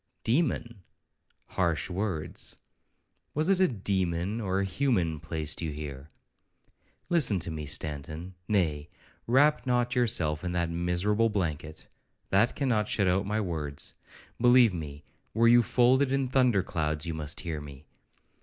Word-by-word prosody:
'—'Demon!—Harsh 110 - -3
words!—Was 100 - -5
it 190 - +2
a 185 - +5
demon 95 -1 -1
or 95 -2 -1
a 100 - +1
human 95 -4 +1
being 80 -1 -6
placed 80 -1 -4
you 80 - -2
here?—Listen 75 - -4
to 85 -1 -4
me, 75 -2 -5
Stanton; 80 +5 -3
nay, 80 -8 0 0.4
wrap 140 +4 +3
not 120 -1 +1
yourself 85 - +1
in 90 -1 -3
that 85 -1 -1
miserable 90 +6 +1
blanket,—that 90 +4 -2
cannot 115 -7 0
shut 100 -3 +1
out 95 +2 +1
my 105 +1 0
words. 80 -8 -1 0.5
Believe 120 -3 +6
me, 75 -3 -7 0.3
were 115 +1 +4
you 120 +1 +7
folded 130 +3 +3
in 135 -1 0
thunderclouds, 90 - +1
you 85 - -3
must 80 +3 -4
hear 80 -5 -4
me! 70 -1 -11
95 Hz, 125 wpm, -28 LUFS, 80-120 Hz, 0.5 s, you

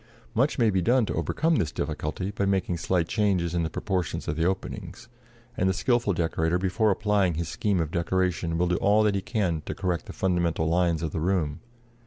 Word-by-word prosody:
Much 130 +6 +1
may 115 -4 +3
be 95 -1 +1
done 120 +4 +3
to - - -3
overcome 160 0 +1
this 75 - 0
difficulty 75 +6 -3
by 100 0 -2
making 95 -2 +1
slight 85 +1 0
changes 95 -6 +1
in 85 - +1
the 80 - -1
proportions 90 -4 -2
of 75 - -1
the 80 - 0
openings; 95 +4 -3 0.5
and 95 - +1
the - - +2
skilful 120 -1 +1
decorator, 80 -1 0
before 95 +4 +1
applying 100 -3 +1
his 85 +1 -2
scheme 100 +3 0
of 80 -2 -1
decoration, 85 -1 0
will 90 - +2
do 90 0 +1
all 105 +2 +3
that 105 -1 +3
he 100 - -1
can 95 -5 -1
to - - -3
correct 90 -3 -2
the - - -6
fundamental 85 -3 0
lines 85 -1 +1
of 80 - -2
the 80 - -3
room. 85 -5 0
90 Hz, 210 wpm, -26 LUFS, 85-100 Hz, 0.5 s, may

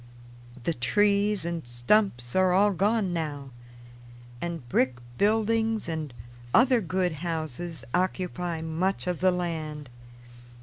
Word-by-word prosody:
The 170 - 0
trees 205 +7 +2
and 170 -5 -4
stumps 120 - +1
are 185 -1 +4
all 205 +2 +5
gone 200 0 +1
now 145 -5 -4 0.9
and 170 -7 -4
brick 125 +1 +1 0.2
buildings 220 +1 +2
and 160 -4 -3 0.4
other 250 -1 +5
good 185 0 0
houses 160 -3 -4
occupy 180 -2 -1
much 170 +4 -1
of 180 -2 -2
the 185 - +4
land. 155 -6 -3
175 Hz, 115 wpm, -27 LUFS, 155-200 Hz, 0.9 s, all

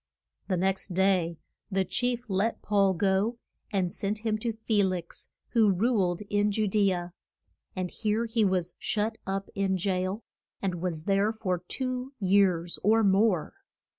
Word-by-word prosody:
The 185 - 0
next 190 0 -1
day 185 -3 +2 0.3
the 190 -1 +1
chief 245 +5 -1
let 200 +3 0
Paul 200 -2 +3
go, 200 +6 +1 0.3
and 190 -4 0
sent 210 +3 -3
him 215 -1 +1
to 230 +1 -1
Fe 220 -1 0
lix, 185 -3 -3 0.2
who 225 -4 +4
ruled 190 -3 +1
in 205 0 +1
Ju 215 +1 +1
de 200 0 +3
a. 175 -1 -4 0.6
And 185 -1 -3
here 220 +1 0
he 225 -1 +1
was 185 -3 +1
shut 220 +1 -1
up 195 0 -3
in 195 -1 0
jail, 185 +3 -1 0.4
and 180 -4 -2
was 170 -4 -2
there 200 +3 +2
for 190 -5 -2
two 255 0 -3
years 185 -4 +2
or 220 +3 +4
more. 195 -3 +3
195 Hz, 155 wpm, -28 LUFS, 185-220 Hz, 0.6 s, who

